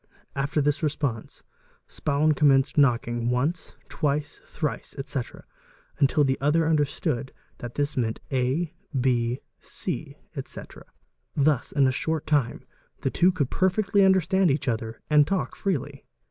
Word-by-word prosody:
After 140 +2 0
this 145 +1 +1
res 155 -2 0
pe 145 - +1
nse, 110 -2 -10 0.4
Spaun 150 +1 +1
commenced 140 -2 +3
knocking, 120 -4 +2
once, 140 +8 -1
twice, 145 -1 -2
thrice, 150 -7 -4
etc., 135 -2 -4 0.6
until 145 +2 +4
the 135 -1 0
other 155 +3 +3
understood 145 -4 0 0.3
that 120 -1 -7
these 145 0 -1
meant 115 -3 -1
a,b,c, 130 -3 -2 0.2
etc. - - -8 0.5
Thus 140 -3 +2
in 140 -2 +3
a 130 - +3
short 160 +3 -2
time 145 -6 0 0.4
the - - 0
two 180 +2 +4
could 150 -8 -1
perfectly 200 +2 +2
understand 190 -1 +4
each 140 0 0
other 115 -1 -2
and 150 -1 +6
talk 195 - -1
freely. 185 -9 -3
145 Hz, 130 wpm, -26 LUFS, 130-155 Hz, 0.6 s, and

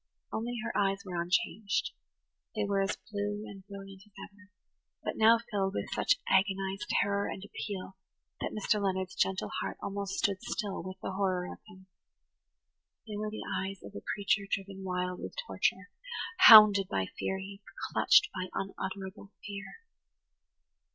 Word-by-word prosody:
Only 235 +2 -2
her 230 - -4
eyes 195 0 +1
were 175 -2 -2
unchanged; 185 +4 0 0.6
they 215 - 0
were 200 -1 +1
as 195 +1 0
blue 205 0 -2
and 195 -1 -10
brilliant 195 -1 -10
as 210 - -26 0.2
ever, 205 0 -20 0.5
but - - -2
now 225 +1 +6
filled 195 -2 0
with - - -3
such 340 - +3
agonized 195 +2 +1
terror 200 0 +1
and 190 - -6
appeal 195 -2 -6 0.4
that - - -2
Mr. 210 0 +1
Leonard's 190 -1 -1
gentle 190 0 0
heart - - -4
almost 200 0 -4
stood 195 -2 +1
still 210 -4 -3
with 185 +1 -7
the - - -2
horror 190 -2 0
of - - -14
them. 190 +1 -15 1.2
They 210 - -5
were 210 +1 -2
the 215 - -6
eyes 190 0 -4
of 100 - -10
a 100 - -7
creature 200 0 +1
driven 195 0 -3
wild 180 -1 -2
with - - -7
torture, - - -1 0.6
hounded 210 -3 +10
by 95 - 0
furies, 195 +1 -4 0.3
clutched - - +6
by 185 0 -3
unutterable 195 +1 -5
fear. 200 -1 -6
195 Hz, 150 wpm, -31 LUFS, 190-205 Hz, 1.2 s, hounded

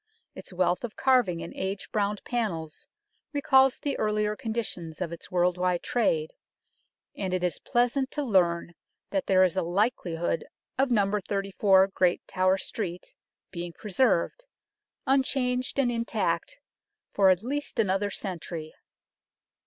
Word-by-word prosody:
Its - - -10
wealth 180 +1 +1
of 240 - -5
carving 240 -11 +2
and 165 - -8
age 195 +1 -4
browned 205 -1 -1
panels 170 -10 -3 0.5
recalls 270 -2 +4
the 285 -2 -2
earlier 210 0 +1
conditions 220 -9 -4
of 180 -3 -3
its 170 - -8
world 180 0 +1
wide 180 -1 +1
trade, 465 - +1 0.8
and 190 -2 -2
it 180 - -2
is 180 - -1
pleasant 245 +3 +1
to 295 - -3
learn 175 -7 +2 0.4
that 290 -2 -1
there 185 -1 +5
is 185 -2 +2
a 190 - +1
likelihood 175 -3 0 0.3
of 270 0 +2
No. 210 -3 +2
34 195 -1 +3
Great 180 -2 +1
Tower 185 +1 +2
Street 180 -2 -5 0.4
being 175 -1 -5
preserved, 220 - 0 0.6
unchanged 260 -2 +1
and 260 -3 +2
intact, 240 - -1 0.6
for 195 -2 +5
at 185 +2 +3
least 290 +4 -3
another 205 -1 +1
century. 170 -5 -5
200 Hz, 135 wpm, -27 LUFS, 180-245 Hz, 0.8 s, there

